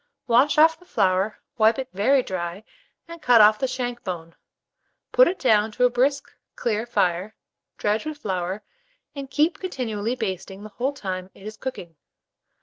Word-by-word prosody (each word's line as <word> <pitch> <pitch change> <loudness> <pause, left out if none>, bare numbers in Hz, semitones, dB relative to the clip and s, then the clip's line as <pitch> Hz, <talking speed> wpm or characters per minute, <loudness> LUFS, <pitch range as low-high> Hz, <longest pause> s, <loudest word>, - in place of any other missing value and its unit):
Wash 255 +5 +3
off 320 +1 +5
the 360 - -19
flour, 190 - +1 0.2
wipe 220 +3 +4
it 265 -1 -4
very 255 +7 +3
dry, 180 0 -5 0.4
and 335 0 -10
cut 245 -5 +5
off 210 0 +6
the 265 - 0
shank 245 -1 -4
bone; 170 -4 -6 0.8
put - - +6
it 370 - -1
down 220 -4 +3
to 250 - +2
a 250 - +3
brisk 275 +3 0 0.2
clear 225 0 -2
fire, 185 -1 0 0.4
dredge 215 +8 -1
with 310 -1 -5
flour, 190 -4 -3 0.5
and 275 -2 -7
keep 305 +4 +1
continually 240 - -3
basting 195 -3 -5
the 215 - -9
whole 255 +7 -2
time 185 -7 -5
it 195 - -15
is 215 0 -7
cooking. 180 - -7
220 Hz, 165 wpm, -24 LUFS, 195-265 Hz, 0.8 s, off